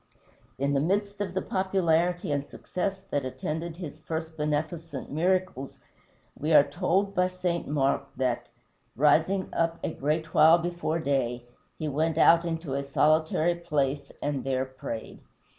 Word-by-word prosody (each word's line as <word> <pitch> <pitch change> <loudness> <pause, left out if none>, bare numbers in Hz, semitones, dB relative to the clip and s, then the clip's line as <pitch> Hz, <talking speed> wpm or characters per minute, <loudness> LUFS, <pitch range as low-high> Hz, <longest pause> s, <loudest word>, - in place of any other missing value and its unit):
In 140 +1 0
the 140 - +3
midst 200 +6 0
of 190 -3 -3
the 190 - 0
popularity 180 -3 +1
and 140 -1 0
success 190 +5 -4
that 145 - 0
attended 155 +6 -4
his 155 -4 -7
first 160 +1 -5
beneficent 150 0 -3
miracles, 175 -3 0 0.6
we 155 +3 -2
are 140 - +9
told 190 +2 0
by 180 -1 +3
St. 180 -2 -2
Mark 140 -1 +1
that, 125 -2 -1 0.5
"rising 165 +7 +3
up 165 0 +1
a 160 - -2
great 155 +3 -2
while 160 +2 +7
before 170 -1 -2
day, 130 -6 -1 0.3
he 155 - -3
went 155 +3 0
out 170 +1 +6
into 165 -4 -3
a 140 +1 -1
solitary 155 +4 +2
place 145 -5 -1
and 145 -2 -1
there 130 -1 0
prayed." 130 -4 -7
160 Hz, 145 wpm, -27 LUFS, 140-175 Hz, 0.6 s, are